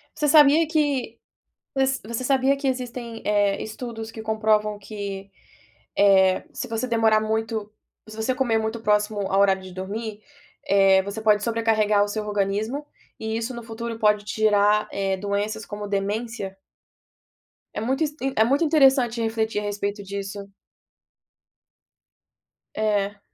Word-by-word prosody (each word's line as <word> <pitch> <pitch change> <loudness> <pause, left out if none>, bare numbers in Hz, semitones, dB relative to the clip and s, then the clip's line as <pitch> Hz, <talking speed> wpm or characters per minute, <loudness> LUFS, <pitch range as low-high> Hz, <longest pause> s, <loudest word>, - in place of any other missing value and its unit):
Você 300 -1 0
sabia 300 +2 +6
que 290 -7 -1 0.6
vo 270 - +1 0.3
você 235 +2 -3
sabia 270 +1 +3
que 275 0 -3
existem, 245 -3 -4
eh, 205 -1 +2
estudos 225 0 -7
que 225 - -8
comprovam 215 -1 +1
que, 200 -1 -7 0.7
eh, 190 -2 +4
se - - -5
você 230 +2 -2
demorar 225 -2 +3
muito 220 -1 -2 0.4
se 215 - -10
você 220 +4 -1
comer 245 -4 +1
muito 220 +1 -3
próximo 210 -1 +1
ao 195 - +2
horário 195 -1 +3
de 185 -1 -10
dormir, 205 +3 -5 0.5
eh, 195 -1 +5
você 200 +3 -6
pode 210 -1 +3
sobrecarregar 220 -2 +2
o - - -5
seu 215 +1 -3
organismo 210 +7 -2 0.3
e 220 0 -3
isso 230 +3 -3
no 235 - -7
futuro 230 0 -6
pode 210 -1 +2
te 220 +1 -5
gerar, 210 0 +3
eh, 195 -1 -1
doenças 205 +2 -3
como 205 0 -6
demência? 200 0 -3 1.2
É - - -4
muito 265 +7 -1
inst 295 -1 -4 0.2
é 220 - +5
muito 275 +7 +2
interessante 270 -6 +4
refletir 225 -1 -1
a - - -6
respeito 205 0 -3
disso. 200 0 -6 2.3
É. 205 -2 0
220 Hz, 145 wpm, -24 LUFS, 205-235 Hz, 2.3 s, sabia